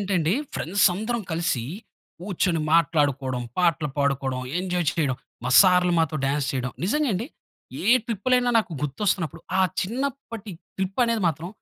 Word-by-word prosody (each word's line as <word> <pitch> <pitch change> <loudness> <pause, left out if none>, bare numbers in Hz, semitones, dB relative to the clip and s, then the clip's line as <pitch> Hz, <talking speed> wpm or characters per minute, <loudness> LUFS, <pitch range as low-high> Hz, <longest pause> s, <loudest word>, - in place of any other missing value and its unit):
అంటే 200 -1 -1
అండి, 165 +3 +1 0.2
ఫ్రెండ్స్ 185 +4 +2
అందరం 220 +4 -2
కలిసి, 160 -7 -1 0.6
కూర్చొని 180 -3 0
మాట్లాడుకోవడం, 145 -6 +2 0.2
పాటలు 165 -4 +2
పాడుకోవడం, 135 -2 0 0.2
ఎంజాయ్ 180 -2 -1
చేయడం, 140 -6 0 0.3
మా 125 - -1
సార్‌లు 180 -2 +5
మాతో 155 -1 0
డాన్స్ 140 0 0
చేయడం. 125 -2 -3
నిజంగా 295 +7 +1
అండి. 210 +6 -2 0.6
ఏ - - -2 0.2
ట్రిప్పులైనా 245 +3 +1
నాకు 210 -5 -2
గుర్తొస్తున్నప్పుడు 165 +1 -1 0.2
ఆ - - +5 0.2
చిన్నప్పటి 235 -1 -4 0.3
ట్రిప్ 190 +4 -2
అనేది 230 -3 0
మాత్రం 165 +2 -4
175 Hz, 140 wpm, -24 LUFS, 150-205 Hz, 0.6 s, సార్‌లు